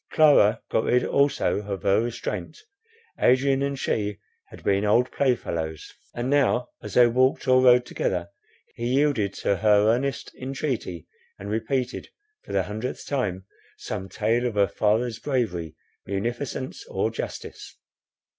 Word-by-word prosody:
Clara 145 Hz, -9 st, +5 dB
got 110 Hz, -, +1 dB
rid 125 Hz, -, +2 dB
also 140 Hz, 0 st, +2 dB
of 100 Hz, -2 st, -5 dB
her 100 Hz, +1 st, +3 dB
restraint; 120 Hz, 0 st, -4 dB, 0.6 s
Adrian 135 Hz, +2 st, +3 dB
and 140 Hz, 0 st, -1 dB
she 105 Hz, -5 st, -1 dB, 0.3 s
had -, -, -14 dB
been 100 Hz, 0 st, +2 dB
old 115 Hz, +4 st, +3 dB
playfellows; 85 Hz, -, -2 dB, 0.2 s
and 120 Hz, +1 st, -2 dB
now, 130 Hz, -3 st, +2 dB
as -, -, -8 dB
they 125 Hz, -, +8 dB
walked 130 Hz, +4 st, +2 dB
or 130 Hz, 0 st, +5 dB
rode 125 Hz, -1 st, +6 dB
together, 90 Hz, -6 st, -2 dB, 0.5 s
he 120 Hz, -, -4 dB
yielded 130 Hz, -6 st, +2 dB
to 100 Hz, -, -1 dB
her 105 Hz, +1 st, +4 dB
earnest 130 Hz, -1 st, -2 dB
entreaty, 130 Hz, -, -3 dB, 0.3 s
and 100 Hz, +1 st, -7 dB
repeated, 125 Hz, +4 st, -2 dB, 0.3 s
for -, -, -11 dB
the 95 Hz, -1 st, +1 dB
hundredth 110 Hz, +6 st, -5 dB
time, 95 Hz, -10 st, -2 dB, 0.3 s
some 95 Hz, +1 st, -6 dB
tale 115 Hz, +6 st, 0 dB
of 115 Hz, -, -4 dB
her 100 Hz, -1 st, +4 dB
father's 110 Hz, +3 st, 0 dB
bravery, 100 Hz, -, -2 dB, 0.3 s
munificence, 120 Hz, +6 st, -4 dB
or -, -, -1 dB
justice. -, -, -7 dB
120 Hz, 140 wpm, -25 LUFS, 100-130 Hz, 0.6 s, they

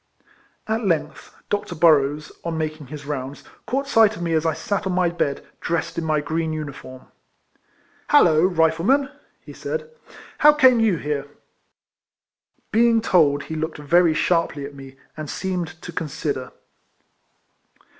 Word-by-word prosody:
At 220 Hz, +2 st, -1 dB
length 170 Hz, -6 st, -2 dB
Dr. 205 Hz, -3 st, -3 dB
Burroughs, 150 Hz, -2 st, +3 dB
on 170 Hz, -1 st, -3 dB
making 155 Hz, -2 st, -4 dB
his 145 Hz, +1 st, -9 dB
rounds, 140 Hz, -1 st, -5 dB, 0.2 s
caught 275 Hz, +2 st, -1 dB
sight 220 Hz, -4 st, +4 dB
of 175 Hz, -, -6 dB
me 165 Hz, -1 st, -1 dB
as 160 Hz, 0 st, +1 dB
I 160 Hz, -, 0 dB
sat 200 Hz, +5 st, -2 dB
on 185 Hz, -, -1 dB
my 180 Hz, -1 st, +2 dB
bed, 170 Hz, -5 st, -2 dB
dressed 165 Hz, 0 st, -2 dB
in 170 Hz, -, -2 dB
my 155 Hz, -2 st, +1 dB
green 160 Hz, +1 st, -2 dB
uniform. 140 Hz, -4 st, -7 dB, 0.6 s
'' -, -, -36 dB
Hallo! 165 Hz, -, +5 dB
Rifleman," 185 Hz, -, +2 dB, 0.3 s
he -, -, -12 dB
said, 475 Hz, 0 st, -5 dB, 0.2 s
" -, -, -18 dB
how 300 Hz, 0 st, +7 dB
came 260 Hz, -5 st, +5 dB
you 220 Hz, -5 st, +3 dB
here?" 145 Hz, -1 st, -3 dB, 1.4 s
Being 230 Hz, 0 st, +4 dB
told, 150 Hz, -9 st, +3 dB
he 160 Hz, -, -6 dB
looked 160 Hz, +1 st, -3 dB
very 165 Hz, +2 st, +3 dB
sharply 165 Hz, -4 st, 0 dB
at 140 Hz, -, -9 dB
me, 135 Hz, -1 st, -12 dB, 0.2 s
and 155 Hz, -2 st, -7 dB
seemed 175 Hz, -2 st, -4 dB
to 175 Hz, -, -7 dB
consider. 145 Hz, -5 st, -4 dB
165 Hz, 150 wpm, -22 LUFS, 150-190 Hz, 1.4 s, how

